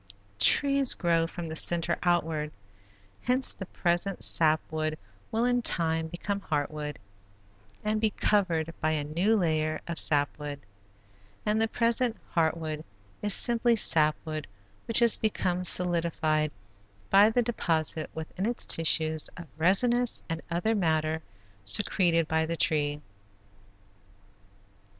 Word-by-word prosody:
Trees 275 - +4
grow 165 -2 0
from 170 0 -7
the 160 - -6
center 170 +1 +2
outward, 160 -4 -1 0.7
hence 255 +2 +2
the 190 - -9
present 175 +3 -1
sap 155 -1 +3
wood 155 0 -3 0.3
will 230 +2 0
in 245 0 +1
time 160 -6 0
become 200 +4 -5
heart 145 -5 -2
wood 150 -1 -6 0.9
and 215 0 -1
be 220 - +2
covered 170 -7 -1
by 155 0 0
a 150 -2 -2
new 175 +9 0
layer 155 -4 -1
of 170 -1 +3
sap 145 0 +3
wood, 145 -1 -6 0.9
and 215 +1 0
the 225 - +2
present 230 +1 0
heart 165 -1 +1
wood 155 -1 -6 0.4
is 205 -1 +3
simply 235 -1 +2
sap 155 -7 +4
wood 155 -2 -5 0.4
which 230 - +1
has 235 -2 +5
become 180 -4 -2
solidified 165 -4 +2 0.6
by 200 +2 +6
the 245 +2 +1
deposit 160 -9 -2
within 160 +5 -5
its 240 0 0
tissues 160 -1 +2
of 175 - -8
resinous 235 +9 +2
and 165 -1 -4
other 175 +7 -1
matter 160 -5 -1 0.4
secreted 165 - +2
by 160 0 0
the 165 +1 -4
tree. 145 -2 +1
170 Hz, 130 wpm, -27 LUFS, 155-210 Hz, 0.9 s, by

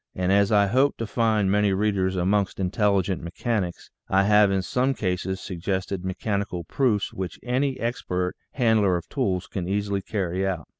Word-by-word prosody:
And 90 0 0
as 100 +1 +3
I 100 -1 +5
hope 130 +8 +2
to 115 - -3
find 110 -3 +1
many 105 -1 +3
readers 95 -2 +1
amongst 95 +2 0
intelligent 95 -1 +1
mechanics, 90 +1 -3 0.2
I 95 +1 +4
have 105 0 +5
in 95 -1 0
some 130 +6 0
cases 95 -1 -2
suggested 95 +1 -3
mechanical 95 -1 -2
proofs 105 - 0
which 95 -3 -5
any 130 +2 0
expert 90 -6 -2 0.2
handler 110 -7 +3
of 85 - -8
tools 95 -10 -1
can 90 -3 -5
easily 100 0 -1
carry 95 -2 -2
out. 95 -5 -2
100 Hz, 160 wpm, -25 LUFS, 95-105 Hz, 0.2 s, I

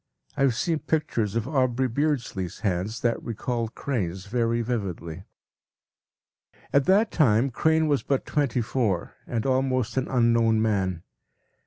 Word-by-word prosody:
I 145 - -3
have 135 -4 +3
seen 165 +4 0
pictures 115 -11 -1
of 115 +1 -1
Aubrey 130 -3 +1
Beardsley’s 120 - -2
hands 100 +2 -1
that 120 -1 0
recalled 115 0 -3
Crane’s 95 -9 -3
very 115 +2 0
vividly. 95 -7 -4 1.5
At 140 -1 +4
that 205 +6 +4
time 130 -3 +3
Crane 160 +5 +2
was 145 -2 +2
but 135 -2 -1
twenty 140 -5 0
four, 110 -6 -1
and 115 -2 -2
almost 130 -2 0
an 130 - +1
unknown 115 -3 +3
man. 95 -6 0
120 Hz, 135 wpm, -26 LUFS, 105-135 Hz, 1.5 s, At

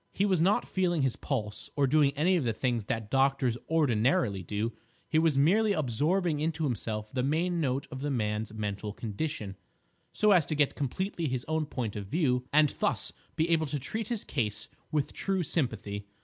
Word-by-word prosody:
He 200 - +1
was 185 -5 +2
not 195 +5 +3
feeling 175 -5 +1
his 130 -3 +1
pulse, 105 -7 -3
or 145 - +3
doing 140 +1 +4
any 170 +6 +3
of 170 - +1
the 115 -2 0
things 120 -2 -1
that 110 -1 -3
doctors 135 -2 +2
ordinarily 125 - +2
do; 105 +5 -2 0.3
he 155 - +2
was 160 -4 +2
merely 205 +9 +4
absorbing 155 - +1
into 160 +1 -1
himself 110 -5 -2
the 130 - -1
main 165 +6 0
note 135 -1 0
of 130 - -6
the 145 - -1
man's 110 -4 -1
mental 105 -1 -4
condition, 110 -2 -4 0.6
so 210 -1 +3
as 180 -6 +5
to 155 - -1
get 145 -1 +2
completely 170 - -2
his 130 -2 -2
own 155 -1 0
point 115 -7 -3
of 100 -2 -5
view, 125 - +1
and 150 0 +5
thus - - +2 0.2
be 160 - +1
able 160 -2 +2
to 145 - -2
treat 215 - -4
his 230 -3 -2
case 105 -5 -2 0.2
with 150 -2 0
true 190 -2 0
sympathy. 105 - -2
140 Hz, 190 wpm, -29 LUFS, 115-165 Hz, 0.6 s, as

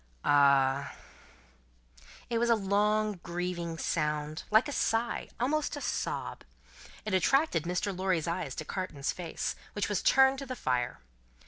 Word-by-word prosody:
"Ah!" 140 -1 +4 1.3
It 235 -2 0
was 235 0 +1
a 230 - +6
long, 210 0 +1
grieving 175 -1 -3
sound, 150 -1 -2
like 220 +6 +5
a - - -4
sigh 235 -3 0
almost 295 +5 0
like 290 - -6
a - - -2
sob. - - -3 0.6
It 215 - -3
attracted 185 - +2
Mr. 180 +3 -1
Lorry's 185 -3 0
eyes 165 -6 -3
to 155 - -5
Carton's 150 -6 -3
face, 175 -2 -4 0.2
which 205 - -1
was 205 - 0
turned 265 0 +5
to 275 - -7
the 255 - -4
fire. 125 - -1
185 Hz, 145 wpm, -30 LUFS, 155-225 Hz, 1.3 s, a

